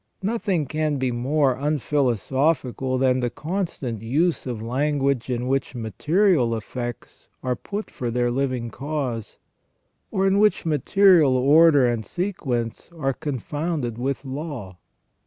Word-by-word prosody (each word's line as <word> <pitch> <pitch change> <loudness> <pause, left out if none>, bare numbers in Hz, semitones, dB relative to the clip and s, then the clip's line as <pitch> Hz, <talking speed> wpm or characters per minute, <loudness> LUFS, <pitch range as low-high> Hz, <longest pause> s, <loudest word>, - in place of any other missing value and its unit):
Nothing 195 -6 0
can 155 +1 -1
be 130 -1 0
more 135 +3 +1
unphilosophical 135 - 0
than 130 0 +2
the 125 -1 0
constant 150 - -4
use 150 +8 0
of 120 -3 -3
language 135 +2 0
in 125 -1 -1
which 135 0 -1
material 125 - +2
effects 120 +2 -7
are 125 -1 0
put 205 +9 -6
for 120 - -4
their 120 +1 0
living 130 -2 -1
cause, 135 -6 -4 0.7
or 190 0 0
in 195 +1 +3
which 210 -3 +3
material 160 -2 +4
order 145 +1 +6
and 120 -2 0
sequence 130 - -3
are 135 -3 0
confounded 145 -2 -3
with 135 +2 -2
law. 130 - -6
135 Hz, 125 wpm, -23 LUFS, 120-155 Hz, 0.7 s, order